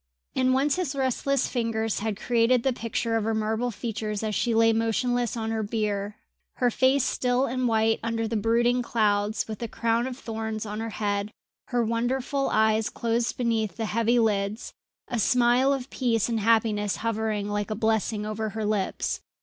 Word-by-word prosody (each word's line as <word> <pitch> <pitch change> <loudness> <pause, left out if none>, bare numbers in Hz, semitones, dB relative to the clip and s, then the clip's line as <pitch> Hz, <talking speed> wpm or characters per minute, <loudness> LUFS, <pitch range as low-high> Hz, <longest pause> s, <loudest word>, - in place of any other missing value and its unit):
And 255 0 +3
once 275 +3 +2
his 320 -7 -2
restless 270 0 0
fingers 225 -3 -1
had 210 -1 -2
created 235 0 +2
the 265 - +2
picture 230 0 -2
of 225 - -1
her 225 +1 0
marble 220 +3 0
features 215 -1 -4
as 215 -1 -1
she 235 +2 +1
lay 225 0 +5
motionless 235 +1 0
on 225 0 -2
her 220 -1 -1
bier, 210 -1 -2 0.4
her 245 -1 +2
face 260 +2 +3
still 250 +1 +1
and 255 0 -1
white 225 -1 +2
under 225 0 -1
the 225 - -3
brooding 235 +3 +2
clouds, 210 -2 0
with 215 -2 -6
the 235 - -3
crown 230 +2 0
of 255 -1 -6
thorns 220 -3 -4
on 210 0 -5
her 225 0 -3
head, 205 -1 -2 0.4
her 240 -2 0
wonderful 250 +4 -1
eyes 220 0 +2
closed 235 0 -1
beneath 225 -4 0
the 225 - -2
heavy 230 +2 +1
lids, 210 -1 0 0.3
a 240 - -2
smile 245 +4 +3
of 270 -2 -2
peace 230 -4 +1
and 230 -2 -1
happiness 215 -2 +2
hovering 220 -2 -1
like 205 0 -2
a 215 - -2
blessing 220 -1 0
over 215 +1 -3
her 220 0 -4
lips. 205 -3 -1
225 Hz, 180 wpm, -26 LUFS, 215-245 Hz, 0.4 s, lay